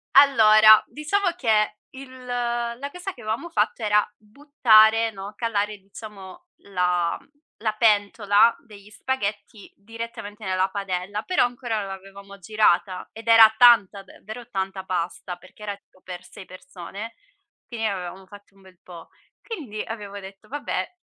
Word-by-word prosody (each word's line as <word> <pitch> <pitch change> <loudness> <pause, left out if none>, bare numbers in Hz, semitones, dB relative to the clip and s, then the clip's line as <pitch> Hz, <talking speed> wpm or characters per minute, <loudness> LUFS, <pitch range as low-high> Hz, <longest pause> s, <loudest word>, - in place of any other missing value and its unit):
Allora, 215 -6 +7
diciamo 360 +6 -1
che 215 -3 +1 0.2
il 260 -1 -12
la 240 +2 -3
cosa 360 +1 -7
che 245 - -15
avevamo 220 +11 -4
fatto 250 - -1
era 210 0 +3
buttare, 225 -2 +3
no, 200 0 -9
calare 210 -3 -2
diciamo 195 -1 -12 0.2
la, 180 -2 0
mhmm - - -26 0.3
la 215 -1 0
pentola 210 0 +3
degli 205 -2 -15
spaghetti 210 -3 -5
direttamente 225 -1 -9
nella 185 0 0
padella, 195 +1 -4
però 365 -6 +2
ancora 245 -3 -2
non 200 - -5
l'avevamo 195 +1 -11
girata, 190 -2 0
ed 225 +1 -12
era 225 -1 +8
tanta, 225 -5 +5
davvero 220 +5 -11
tanta 190 -1 -4
pasta, 180 0 -4
perché 185 +4 -17
era 205 -1 -4
tipo 195 -2 -28
per 180 0 -9
6 195 0 -13
persone; 185 +4 -10 0.5
quindi 230 -2 -6
ne 220 - +2
avevamo 190 -1 -6
fatta 205 0 -16
un 195 - -22
bel 190 -2 -20
po'. 170 -2 -13 0.3
Quindi 270 - -7
avevo 205 -2 -7
detto: 195 +2 -13
"Vabbè", 290 +5 -4
210 Hz, 145 wpm, -23 LUFS, 195-230 Hz, 0.5 s, era